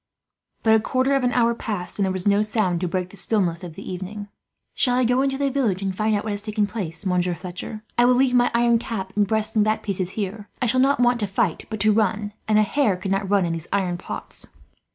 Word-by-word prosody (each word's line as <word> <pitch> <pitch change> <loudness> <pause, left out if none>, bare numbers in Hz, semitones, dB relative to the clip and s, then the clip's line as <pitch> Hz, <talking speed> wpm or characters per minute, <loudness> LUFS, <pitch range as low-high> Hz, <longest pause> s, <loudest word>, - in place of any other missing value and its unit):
But 220 - +5
a 220 - +6
quarter 255 +4 +1
of 270 - +1
an 245 - +2
hour 235 -1 +3
passed, 205 -5 -4
and - - +3
there - - 0
was 185 +1 -2
no 205 +1 +4
sound 210 -5 0
to 180 - 0
break 180 +1 -3
the 200 - -12
stillness 180 -3 +1
of 170 -3 -8
the 195 - -9
evening. 195 +3 -6 0.4
"Shall 245 -2 +1
I 255 - +2
go 250 +2 +2
into 270 0 0
the 280 0 0
village 220 -9 0
and 190 -1 -2
find 215 +2 +1
out 205 - -1
what 220 - -3
has 205 0 -1
taken 210 0 0
place, 200 -4 -5
Monsieur 180 -1 +1
Fletcher? 185 +5 -7 0.2
I 240 - +6
will 250 0 +5
leave 260 0 +3
my 245 0 +4
iron 235 0 +3
cap 195 -5 -5
and 205 -1 +2
breast 220 +1 0
and 215 - +4
back 215 +1 0
pieces 190 -3 -2
here. 205 0 -4
I - - 0
shall 255 +2 +2
not 275 0 +3
want 245 0 +3
to 205 - -1
fight 195 -2 -1
but 220 -1 -4
to 215 +1 +4
run, 210 -1 0
and 215 -1 +3
a 215 - +5
hare 215 -3 +1
could 190 +1 -4
not 195 0 0
run 200 -2 +3
in 170 - -1
these 165 0 -5
iron 185 -3 0
pots." - - -7
210 Hz, 260 wpm, -23 LUFS, 190-235 Hz, 0.4 s, a